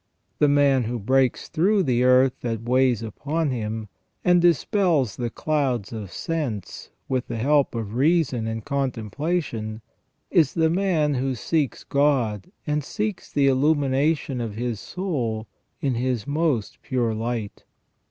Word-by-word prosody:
The 150 - +5
man 140 -3 +3
who 120 +2 -2
breaks 130 +4 +1
through 195 +5 +2
the 125 -4 +2
earth 130 0 +4
that 115 -2 -3
weighs 125 -2 +2
upon 145 +7 -2
him, 110 -2 -3 0.4
and 180 -1 +5
dispels 170 - +2
the 120 -1 -2
clouds 130 -6 -1
of 105 -4 -6
sense 140 - -4 0.2
with 130 -2 -1
the - - -4
help 140 +3 +2
of 110 -3 -4
reason 135 -4 +2
and 110 -1 -4
contemplation, 135 - -2 0.5
is 155 -6 +3
the 160 -1 +3
man 170 -5 +1
who 130 0 -1
seeks 140 +3 -1
God 130 -8 +1
and 150 0 0
seeks 210 +5 -4
the 140 - +2
illumination 140 0 +2
of 110 -3 -4
his 120 -1 -3
soul 125 - -3 0.4
in 140 -4 +1
His 120 -2 -1
most 145 -7 -1
pure 120 -3 0
light. 115 -1 -4
130 Hz, 140 wpm, -24 LUFS, 115-150 Hz, 0.5 s, The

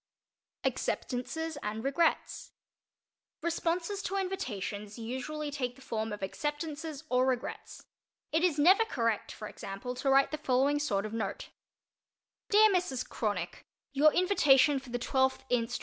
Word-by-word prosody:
_ - - +3
ACCEPTANCES 315 +5 -2
AND 215 +2 -4
REGRETS 310 +4 0 0.9
Responses 340 +3 -1
to 390 - -3
invitations 210 - -3
usually 270 +6 -4
take 250 -4 -3
the 270 - -17
form 220 -2 -3
of 210 -1 -5
"acceptances" 295 - -4
or 255 +1 +3
"regrets." 255 -2 -3 0.5
It 320 +2 +2
is 345 -5 +3
never 370 +9 +6
correct, 230 - -1
for 215 - -7
example, 200 +6 -6
to 270 +2 -1
write 270 0 +5
the 305 - -3
following 275 +1 +2
sort 210 -9 0
of 215 - -6
note: 220 -4 -3 1.0
DEAR 430 0 +7
MRS. 350 -9 0
CRONICK: 200 -6 -3 0.3
Your 300 +2 +6
invitation 295 -7 +4
for 265 -1 -13
the 245 - -1
12th 265 +2 +1
inst. 245 0 0
270 Hz, 140 wpm, -31 LUFS, 230-320 Hz, 1.0 s, DEAR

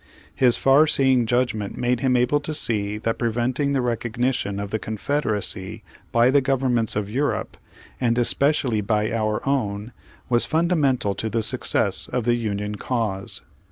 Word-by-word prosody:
His 125 +3 +3
far 140 +4 +4
seeing 130 -5 +3
judgment 120 -4 -1
made 125 0 0
him 130 -2 +1
able 125 +4 +2
to 155 +1 -3
see 105 -5 0
that 115 +1 -3
preventing 120 +4 -1
the 135 - +1
recognition 120 -3 -2
of 100 0 -5
the 110 - -1
Confederacy 110 -3 -2 0.3
by 120 +2 +4
the 140 0 +4
govern 135 -1 0
ments 115 -3 0
of 105 -1 -2
Europe, 135 +7 -2 0.4
and 120 -2 +1
especially 125 -2 +1
by 105 +1 0
our 110 +1 -2
own, 110 -4 -2 0.3
was 120 -1 +3
fundamental 155 - +1
to 110 - -4
the 115 0 -1
success - - +3
of 125 - -2
the 120 +1 +2
Union 105 -3 -3
cause. 105 -5 -3
120 Hz, 155 wpm, -22 LUFS, 105-130 Hz, 0.4 s, far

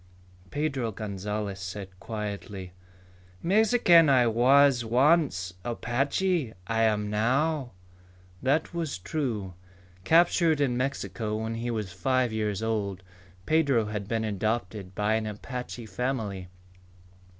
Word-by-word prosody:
Pedro 135 -5 -1
Gonzalez 105 -1 -4
said 95 +1 -6
quietly, 100 -3 -6 0.7
"Mexican 190 -5 +5
I 130 -3 +5
was 125 +3 +5
once. 125 - +2
Apache 135 +4 -1
I 115 +3 0
am 105 -2 +1
now." 130 +6 +1 0.7
That 145 +6 +1
was 165 - -3
true. 105 - -3 0.5
Captured 165 - +4
in 135 -4 +1
Mexico 120 -4 -2
when 110 +1 -3
he 115 +1 -3
was 105 -6 -3
five 130 +4 +1
years 105 -1 -1
old, 100 -4 -2 0.4
Pedro 140 -8 +3
had 105 -2 -4
been 115 0 -1
adopted 105 -2 -2
by 105 +2 +1
an 110 0 0
Apache 125 +2 -6
family. 110 -4 -3
115 Hz, 110 wpm, -27 LUFS, 105-135 Hz, 0.7 s, Mexican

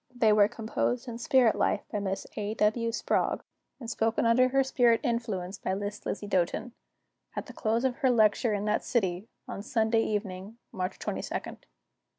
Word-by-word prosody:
They 225 -3 +4
were 205 -1 +6
composed 235 +2 -2
in 235 -1 -6
spirit 240 -2 +4
life - - +1
by 210 - -1
Miss 195 -1 -3
A. 210 +1 -3
W. 230 +2 +1
Sprague, - - 0 0.4
and 240 - -8
spoken 225 0 0
under 255 +3 +4
spirit 240 -3 +3
influence 215 -7 -2
by 190 - -1
Miss 205 +1 -5
Lizzie 205 - -3
Doten, 185 +5 0 0.6
at - - -3
the - - -11
close 230 +3 0
of 260 -1 0
her 275 -4 +2
lecture 220 -1 +3
in 205 0 -2
that 210 0 +1
city, 190 -3 -1 0.2
on - - -5
Sunday 225 0 +1
evening, 205 0 -3 0.2
March 185 -1 -3
22d. - - -4
220 Hz, 165 wpm, -29 LUFS, 205-235 Hz, 0.6 s, were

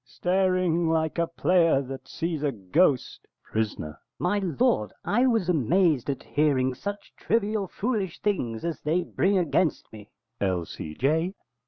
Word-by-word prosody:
staring 180 +1 +1
like 160 0 0
a 170 - +2
player 165 -3 +3
that 135 -1 -7
sees 165 -3 -3
a 145 -2 +1
ghost! 125 - +1 0.2
Pris. 110 -1 -2 0.4
My 195 +4 0
lord, 140 - +1
I 245 +5 +3
was 225 -7 +1
amazed 160 - +2
at 135 - -3
hearing 135 -4 +1
such 205 +10 -6
trivial, 215 -2 0
foolish 205 -4 -2
things 125 - -1
as 165 -4 -3
they 165 +4 +1
bring 195 +3 +1
against 165 -4 0
me. 105 -1 -11 0.3
_L.C.J. 100 - -1
165 Hz, 135 wpm, -26 LUFS, 135-185 Hz, 0.4 s, player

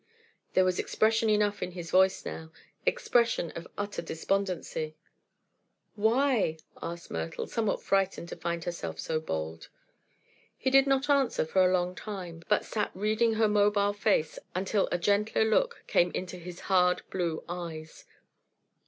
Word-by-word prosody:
There 185 - +4
was 185 -1 +1
expression 225 0 +2
enough 210 -1 +2
in 180 - -3
his 170 -2 -7
voice 190 +1 +4
now; 160 0 -6 0.4
expression 235 - +2
of 170 - -8
utter 205 0 -3
despondency. 170 -3 -2 1.0
"Why?" 220 - +2 0.2
asked 170 0 -6
Myrtle, 80 0 -3
somewhat 225 -3 -1
frightened 195 -3 +1
to - - -5
find 170 -1 -3
herself 175 0 -5
so 160 -1 -1
bold. 80 - -5 0.9
He 260 - 0
did 270 +1 +6
not 270 0 +2
answer 275 - +2
for 185 +4 +3
a 180 - +4
long 180 -1 +1
time, 185 -5 -7
but 210 - +2
sat 210 -2 -1
reading 215 +3 +2
her 220 0 +3
mobile 205 -1 +3
face 200 -7 +1 0.2
until 195 +2 +1
a - - +2
gentler 205 +4 +2
look 470 - +1
came 175 - +3
into 180 0 -4
his 175 0 -9
hard 180 -2 +3
blue 170 -4 -2
eyes. 165 -3 -7
190 Hz, 145 wpm, -29 LUFS, 170-215 Hz, 1.0 s, did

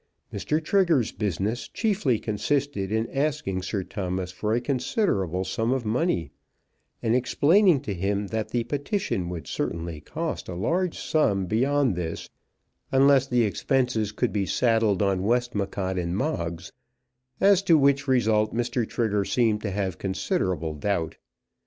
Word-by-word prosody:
Mr. 155 - 0
Trigger's 170 - +3
business 105 +3 -2
chiefly 195 - 0
consisted 115 -1 -1
in 110 +1 0
asking 140 -10 -1
Sir 95 +1 -3
Thomas 90 -1 -4
for 105 +4 -3
a - - +2
considerable 120 - 0
sum 115 +5 -1
of 130 -3 -1
money, 115 - 0 0.7
and 115 - +2
in 125 - +4
explaining 150 - +4
to 130 -8 -4
him 100 +3 -1
that 110 -1 -2
the 120 -1 0
petition 135 - -2
would 85 -2 -6
certainly 85 -2 -4
cost - - -4
a 90 - -5
large 170 - 0
sum 100 -12 +1
beyond 130 +3 +1
this, 85 -2 -5 0.6
unless 135 0 +5
the 125 -2 +2
expenses 115 -1 0
could 105 - -1
be 100 -3 0
saddled 110 -5 +2
on 95 -2 +1
Westmacott 100 -4 -1
and 85 +1 -2
Moggs, 85 - -3 0.7
as 195 -1 +5
to 170 -5 +5
which 140 0 +3
result 110 -5 +2
Mr. 120 -1 -1
Trigger 105 -4 0
seemed 110 0 +1
to 105 - -2
have 95 -3 -3
considerable 90 -4 -1
doubt. 80 +1 -2
110 Hz, 145 wpm, -26 LUFS, 95-135 Hz, 0.7 s, unless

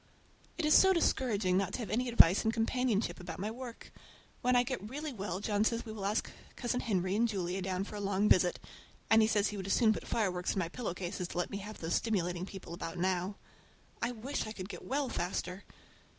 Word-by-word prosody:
It 340 - 0
is 300 - +5
so 380 0 +7
discouraging 215 - +2
not 195 0 0
to - - -1
have 205 -5 -5
any 245 +3 0
advice 195 -5 +6
and 220 - +2
companionship 230 -1 0
about 175 -2 -6
my 205 +4 -3
work. 240 0 -9 0.5
When 250 0 +3
I 245 - +5
get 240 -5 -4
really 295 +3 -4
well 195 -4 -3
John 205 0 +1
says 230 +2 0
we 220 - -6
will 205 -2 -3
ask 210 +2 -1 0.2
Cousin 250 0 -1
Henry 190 -5 0
and 235 +2 +3
Julia 190 -3 -2
down 185 0 -1
for 210 +1 -7
a - - -4
long 200 +1 +1
visit; 180 -2 +4 0.5
but 225 0 +7
he 215 - +5
says 210 -2 +2
he 210 - -5
would 190 -1 -5
as 195 - +2
soon 220 -3 +5
put - - -7
fire 215 -5 +1
works 180 0 -2
in - - -5
my 170 -3 -1
pillow 215 -3 -4
case 180 -1 -4
as 180 - -1
to - - -7
let 180 - -1
me 200 - -3
have 210 +2 -7
those 165 0 -3
stimulating 180 -4 0
people 190 -4 -8
about 170 -1 -5
now. 185 +2 0 0.7
I 235 - 0
wish 245 +2 -3
I 215 - -5
could 190 -2 -7
get - - -8
well 280 +1 -1
faster. 180 -1 -3
205 Hz, 235 wpm, -33 LUFS, 185-235 Hz, 0.7 s, so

